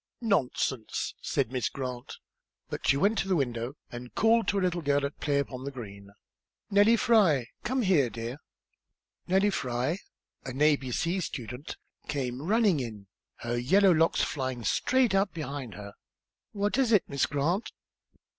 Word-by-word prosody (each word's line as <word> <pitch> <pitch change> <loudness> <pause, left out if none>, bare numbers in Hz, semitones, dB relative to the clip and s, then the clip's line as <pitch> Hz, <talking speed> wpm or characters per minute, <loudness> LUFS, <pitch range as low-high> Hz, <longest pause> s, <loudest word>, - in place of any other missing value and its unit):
"Nonsense," 135 - -1
said 110 - -1
Miss 130 -1 -1
Grant. 125 -2 -6 0.5
But - - -4
she 140 - +4
went 200 +8 +2
to - - -1
the 190 - +2
window 120 -3 -2 0.2
and 120 0 -9
called 225 +1 +3
to 205 - +1
a - - +1
little 180 -1 0
girl 145 -1 +1
at 140 - -6
play 145 -2 0
upon 130 -2 -3
the 140 - -3
green. 100 -7 -9 0.6
"Nellie 205 +3 +6
Fry! 185 - +3
Come 260 +1 0
here, 165 - +3
dear." 115 +4 -6 0.9
Nellie 195 +3 +3
Fry, 130 +2 -1 0.4
an 130 0 -6
a, 150 0 +5
b, 130 -2 -7
c 170 +9 0
student, 125 -4 -6 0.3
came 130 -3 -3
running 200 -1 +3
in, 110 -6 -7 0.3
her 120 +1 -2
yellow 190 +10 +4
locks 165 -1 +3
flying 130 -4 -3
straight 255 - +2
out 195 -1 +1
behind 140 -7 -5
her. 100 0 -9 0.6
"What 205 +5 0
is 255 -4 +2
it, 210 -4 +5
Miss 140 -1 0
Grant?" 155 +9 -1
145 Hz, 160 wpm, -28 LUFS, 125-195 Hz, 0.9 s, Nellie